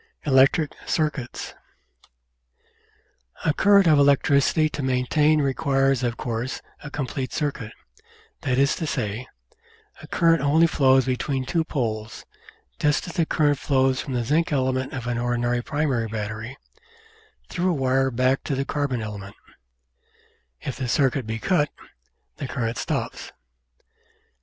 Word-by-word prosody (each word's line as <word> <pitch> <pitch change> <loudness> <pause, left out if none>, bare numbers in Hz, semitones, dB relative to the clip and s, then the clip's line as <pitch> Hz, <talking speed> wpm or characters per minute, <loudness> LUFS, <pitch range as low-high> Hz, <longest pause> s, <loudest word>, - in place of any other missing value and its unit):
Electric 135 +2 +4 0.2
Circuits 150 -6 -2 1.9
A 155 - +3
current 200 +2 +5
of 155 -3 +5
electricity 140 +2 +3
to 150 - -5
be 130 - -1
maintained 150 +4 +2
requires 135 -2 +1
of 120 -2 -1
course 120 +2 -3 0.2
a 150 - -6
complete 135 -3 -4
circuit, 140 -7 -3 0.7
that 130 -1 0
is 140 +1 +3
to 160 - -3
say, 110 0 -3 0.7
a - - -11
current 165 -3 +3
only 150 +4 +4
flows 135 -5 +4
between 130 +1 -1
two 165 +5 0
poles, 110 -8 -4 0.5
just 150 +3 +1
as 175 - -6
a 165 - +2
current 145 -3 +2
flows 135 -1 +1
from 135 - -5
the 120 - 0
zinc 155 +8 +1
element 130 -2 0
of 130 -2 -5
an 120 -1 -1
ordinary 120 0 0
primary 135 -5 -1
battery 110 +3 -5 0.9
through 180 +1 -1
a - - +2
wire 135 -1 +2
back 130 +2 +1
to 140 - -1
the 135 +1 -1
carbon 140 -5 -2
ele 105 -1 -6
ment; 100 +1 -11 1.3
if 135 - -5
the 130 - -3
circuit 130 -1 +1
be 110 0 -2
cut, 150 - +1 0.7
the 140 - -4
current 115 -3 -3
stops. - - -4
135 Hz, 140 wpm, -24 LUFS, 120-150 Hz, 1.9 s, current